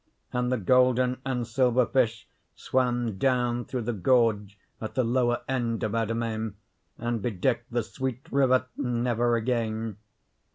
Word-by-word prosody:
And 125 0 0
the 130 - +2
golden 125 +3 +3
and 125 -3 -2
silver 125 +1 +2
fish 115 -4 0 0.3
swam 120 -5 0
down 125 -1 +1
through 125 -3 -3
the 120 +2 -2
gorge 105 -2 +2 0.2
at 110 - -5
the 130 - +2
lower 120 0 +1
end 120 -4 -1
of 110 - -1
our 115 -1 +1
domain 110 -2 -2 0.4
and 120 -2 -2
bedecked 120 +3 -1
the 120 -1 0
sweet 130 +2 -4
river 130 -2 +3
never 120 -2 +1
again. 115 -2 -1
120 Hz, 140 wpm, -27 LUFS, 115-125 Hz, 0.4 s, golden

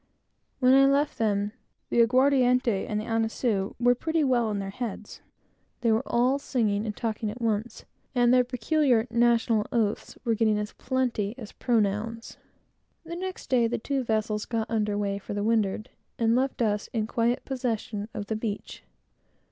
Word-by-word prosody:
When 255 0 +4
I 275 0 +7
left 280 -1 +1
them, 205 -2 +1 0.4
the 235 - +4
aguardiente 250 -3 +3
and 210 - -1
annisou 225 -2 -1
was 245 0 +4
pretty 320 -1 0
well 245 -4 +2
in 210 - -2
their 195 -1 -4
heads, 220 -2 -6
and - - -35 0.5
they 230 -2 +3
were 220 +2 +3
all 255 +4 +2
singing 220 -6 0
and 210 - -4
talking 220 -2 -2
at 220 +4 -7
once, 225 0 -2 0.3
and 245 0 +4
their 250 0 +5
peculiar 250 0 +1
national 235 -2 +2
oaths 220 -2 -1
were 230 - +2
getting 220 -1 +2
as 210 0 -4
plenty 245 -5 -1
as 220 -5 -9
pronouns. 225 0 -1 0.7
The 335 +1 -7
next 375 +1 -6
day, 240 -3 +4
the 230 - -1
two 270 +3 -2
vessels 215 -2 -1
got 225 -2 -2
under 210 -2 0
weigh 200 -1 -1
for 200 - -6
the 205 - -1
windward, 215 -2 0 0.3
and 230 0 +2
left 260 -1 0
us 210 -2 0
in 220 -2 0
quiet 235 +2 0
possession 225 -5 -3
of 205 - -5
the 220 - -3
beach. 215 -2 -5
230 Hz, 170 wpm, -27 LUFS, 210-250 Hz, 0.7 s, I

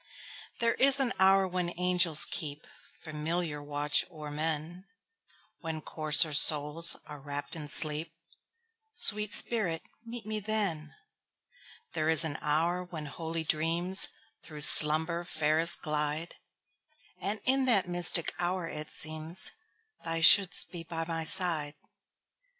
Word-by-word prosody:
There 230 0 -1
is 275 +1 +7
an 260 -3 -2
hour 190 0 +2
when 180 -1 -5
angels 180 -3 +3
keepFamiliar 155 0 -7
watch 145 0 -1
o'er 155 -4 -11
men, 160 +4 -5 0.7
When 160 -1 -7
coarser 155 0 +1
souls 150 +3 +3
are 150 -1 -12
wrapp'd 145 +3 -9
in 155 -2 -9
sleep—Sweet 210 - -4
spirit, 195 -10 -2 0.2
meet 235 -1 -10
me 215 0 -5
then! 195 -8 -3 1.0
There 155 0 -3
is 160 0 +7
an 155 -3 -6
hour 165 +4 -2
when 165 -4 -10
holy 160 +3 -7
dreamsThrough 165 +1 -2
slumber 160 +4 +7
fairest 160 0 -1
glide; 150 +1 -4 0.9
And 205 +2 -4
in 265 +1 -1
that 210 -8 0
mystic 175 -1 +1
hour 175 0 -4
it 150 -1 -9
seemsThou 165 - -7
shouldst 185 0 +5
be 170 -2 -8
by 165 -1 -7
my 165 -1 -5
side. 160 -4 +2
165 Hz, 115 wpm, -27 LUFS, 155-185 Hz, 1.0 s, is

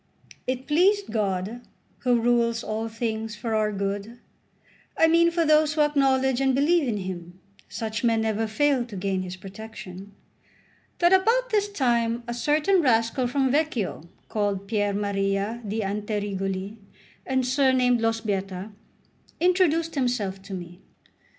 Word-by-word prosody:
CII 255 - +2
IT 260 +1 -10
pleased 390 +6 +3
God, 205 +2 -2 0.4
who 245 -2 +2
rules 235 0 +1
all 220 +1 -3
things 225 -1 -3
for 225 +1 -4
our 215 -1 +1
good 200 +3 -3 0.8
I - - +5
mean, 335 +1 +5
for 335 -1 0
those 305 0 +4
who 310 - +2
acknowledge 265 -3 +2
and 265 -1 +2
believe 300 +2 +3
in 220 -3 -1
Him; 180 -2 -7 0.3
such 220 +1 -4
men 230 -2 +3
never 220 0 0
fail 275 +3 +2
to 235 -4 -10
gain 190 0 -1
His 185 0 -6
protection 195 0 -10 0.8
that 345 +1 +4
about 470 +6 +3
this 415 -1 +1
time 240 - 0
a 240 - -3
certain 300 +9 +2
rascal 245 -1 +2
from 265 +1 +1
Vecchio 285 - 0 0.3
called 200 -2 -2
Piermaria 200 +1 -1
d'Anterigoli, 205 -1 -3 0.5
and 260 -1 +1
surnamed 255 -2 +3
Lo 225 - +3
Sbietta, 200 -3 -3 0.7
introduced 335 -2 +2
himself 235 -8 -1
to 195 0 -7
me. 175 0 -9
230 Hz, 135 wpm, -25 LUFS, 200-275 Hz, 0.8 s, I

